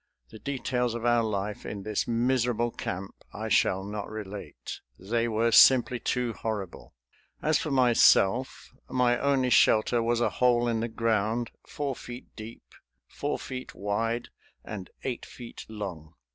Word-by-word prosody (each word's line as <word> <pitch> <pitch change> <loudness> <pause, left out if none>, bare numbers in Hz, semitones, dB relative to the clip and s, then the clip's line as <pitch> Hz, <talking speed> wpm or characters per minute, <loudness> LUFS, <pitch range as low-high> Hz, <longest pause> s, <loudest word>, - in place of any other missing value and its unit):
The 110 - -11
details 125 -3 -1
of 120 0 -4
our 120 -1 +4
life 105 -2 -3
in 100 -2 -6
this 105 -1 -1
miserable 120 0 +1
camp 95 -2 -5 0.2
I - - -5
shall 95 +1 +3
not 105 +1 -5
relate. 100 - -7 0.2
They 115 +5 -1
were 115 +1 +1
simply 125 0 +6
too 125 0 -1
horrible. 105 - -5 0.4
As 155 -1 +2
for 155 - -3
myself, 125 -2 +3 0.2
my 125 -1 +2
only 135 -3 +2
shelter 115 0 +4
was 115 +1 +1
a 120 - +1
hole 120 -1 +4
in 115 -1 0
the 115 +1 -2
ground, 115 +1 0 0.2
four 140 -3 -3
feet 120 +1 -10
deep, 110 +1 -9 0.4
four 145 +1 -3
feet 130 -1 -7
wide 115 +4 -2 0.4
and 100 -4 -7
eight 125 -3 -3
feet 120 -2 -10
long. 90 -7 -7
115 Hz, 145 wpm, -28 LUFS, 105-125 Hz, 0.4 s, simply